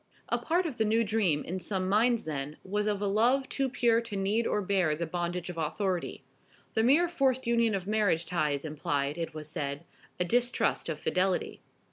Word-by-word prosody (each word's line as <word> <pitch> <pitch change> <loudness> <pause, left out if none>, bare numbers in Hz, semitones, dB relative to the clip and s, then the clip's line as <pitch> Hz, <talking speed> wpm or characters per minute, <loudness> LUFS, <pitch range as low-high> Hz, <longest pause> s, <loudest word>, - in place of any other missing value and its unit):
A - - +1
part 350 +3 +1
of 295 -7 -4
the 220 - +2
new 220 +2 +2
dream 200 -9 +1
in 185 +2 -4
some 185 0 -1
minds 225 +4 +3
then 150 -1 -4
was 210 +2 -1
of 205 -1 0
a - - +1
love 240 +7 +2
too 270 -1 -1
pure 235 -3 +2
to 230 -3 -6
need 205 +4 +1
or 210 - +1
bear 185 -6 +1
the 170 +2 -2
bondage 175 +1 -3
of 175 -2 -5
authority. 180 +3 -2 0.5
The 220 - +2
mere 285 +9 +4
forced 265 -6 +1
union 235 -2 +2
of 190 -2 -3
marriage 205 -5 +1
ties 155 -4 -1
implied, 145 0 -2
it 165 -2 -4
was 155 -1 -6
said, 145 -2 -4 0.4
a 180 - +2
distrust 245 -2 +1
of 155 -2 -3
fidelity. 185 +2 0
195 Hz, 195 wpm, -29 LUFS, 165-230 Hz, 0.5 s, mere